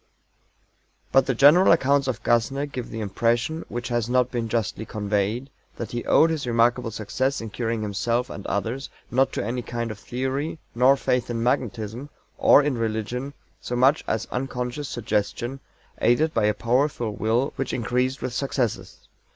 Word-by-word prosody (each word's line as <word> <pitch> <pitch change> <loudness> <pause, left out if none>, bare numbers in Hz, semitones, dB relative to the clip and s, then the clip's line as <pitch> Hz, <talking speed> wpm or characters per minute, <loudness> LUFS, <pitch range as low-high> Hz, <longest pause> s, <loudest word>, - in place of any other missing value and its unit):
But 135 -1 +4
the 135 - +1
general 150 +9 +7
accounts 140 -3 +3
of 130 -4 -3
GASSNER 125 +5 +1
give 130 -4 -6
the 110 - -5
impression, 120 - 0
which 120 +2 -4
has 120 -1 -1
not 125 0 +2
been 115 -2 -2
justly 110 -1 -1
conveyed, 105 +5 -2 0.2
that 115 - -6
he 120 0 -3
owed 165 - +5
his 155 -5 -3
remarkable 120 +1 +2
success 130 +6 -2
in 115 -2 -6
curing 115 -1 -2
himself 115 +4 -1
and 100 - -8
others 115 +6 -2 0.2
not 130 +2 +3
to - - -2
any 120 +3 -2
kind 120 -1 -4
of 105 - -9
theory 130 +7 -3 0.2
nor 130 +3 +5
faith 125 -2 0
in 115 -1 -2
magnetism, 120 +1 -2 0.3
or 145 - +7
in 140 -4 -1
religion, 115 +5 -3 0.3
so 120 - -4
much 135 +5 +4
as 110 - -1
unconscious 125 +2 -3
suggestion, 120 +3 -2 0.4
aided 150 +7 +3
by 110 -2 +2
a 105 0 +2
powerful 120 -1 0
Will 115 +6 0
which 135 - -3
increased 125 +3 -1
with 125 - -3
successes. 130 -3 -2
120 Hz, 165 wpm, -24 LUFS, 115-135 Hz, 0.4 s, general